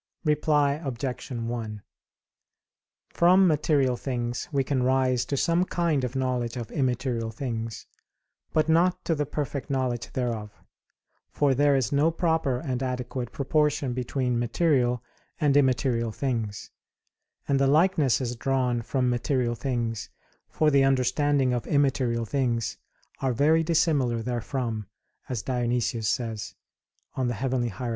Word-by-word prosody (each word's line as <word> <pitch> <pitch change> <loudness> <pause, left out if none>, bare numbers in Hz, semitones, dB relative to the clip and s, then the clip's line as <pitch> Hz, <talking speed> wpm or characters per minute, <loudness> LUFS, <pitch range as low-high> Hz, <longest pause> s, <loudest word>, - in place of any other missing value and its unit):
Reply 150 -1 +2
Obj. 130 -1 -4
1: 115 -3 -4 1.3
From 185 +3 +5
material 145 -5 +2
things 120 0 -3
we 140 -2 +1
can 130 -1 0
rise 130 -1 +2
to 140 - -2
some 170 +4 +2
kind 170 -6 0
of 125 +1 -3
knowledge 125 -2 -1
of 115 -3 -6
immaterial 125 -4 -1
things, 115 -2 -5 0.7
but 155 -1 +2
not 170 +3 +2
to 165 - +1
the 150 -2 -1
perfect 145 -2 -4
knowledge 130 -3 -1
thereof; 115 -4 -2 0.8
for 145 -2 +2
there 145 +1 +3
is 130 -5 0
no 145 +3 +3
proper 160 -6 0
and 130 -2 -3
adequate 125 -1 -3
proportion 145 -2 0
between 125 -1 -1
material 125 -1 +1 0.4
and 145 -3 +2
immaterial 125 -4 +2
things, 115 -5 -3 0.8
and 140 -1 +2
the 135 - +3
likenesses 140 -6 +2
drawn 125 -1 0
from 125 +2 -1
material 125 0 0
things 115 -4 -3 0.4
for 155 -1 +2
the 140 -1 +5
understanding 135 0 +2
of 120 -2 -2
immaterial 130 -5 +1
things 120 -2 -1 0.4
are 130 -2 0
very 155 +6 +3
dissimilar 145 -8 +1
therefrom, 120 -3 -3 0.4
as 120 -4 -3
Dionysius 120 -3 0
says 110 -3 -3 0.6
(Coel. 130 -1 -1
Hier. 120 0 -2
130 Hz, 125 wpm, -26 LUFS, 120-145 Hz, 1.3 s, From